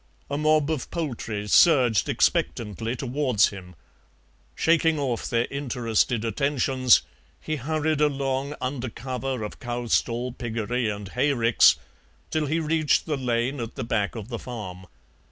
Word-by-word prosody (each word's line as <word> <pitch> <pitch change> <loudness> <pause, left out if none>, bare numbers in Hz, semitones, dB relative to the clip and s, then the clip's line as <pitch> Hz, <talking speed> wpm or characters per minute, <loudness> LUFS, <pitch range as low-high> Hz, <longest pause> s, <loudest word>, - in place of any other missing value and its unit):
A 145 - 0
mob 155 0 +3
of 150 -6 -3
poultry 115 -10 -4
surged 125 - +5
expectantly 110 +2 0
towards 125 -3 +1
him; 90 -3 -11 0.8
shaking 165 -1 +3
off 130 -5 -2
their 115 0 +1
interested 120 -4 0
attentions 130 +1 +3 0.4
he 155 - -3
hurried 155 +2 -1
along 140 -1 0
under 130 -1 -3
cover 130 +1 -4
of 105 - -7
cowstall, 120 0 -1
piggery, 120 0 -2
and 100 -2 -5
hayricks 125 -2 +4 0.6
till 155 -2 0
he 160 +4 0
reached 155 -1 +1
the 155 - -1
lane 125 +1 -1
at 115 -1 -5
the - - -4
back 110 -2 -1
of 110 0 -7
the 115 -2 -4
farm. 95 -7 -8
125 Hz, 135 wpm, -25 LUFS, 115-145 Hz, 0.8 s, surged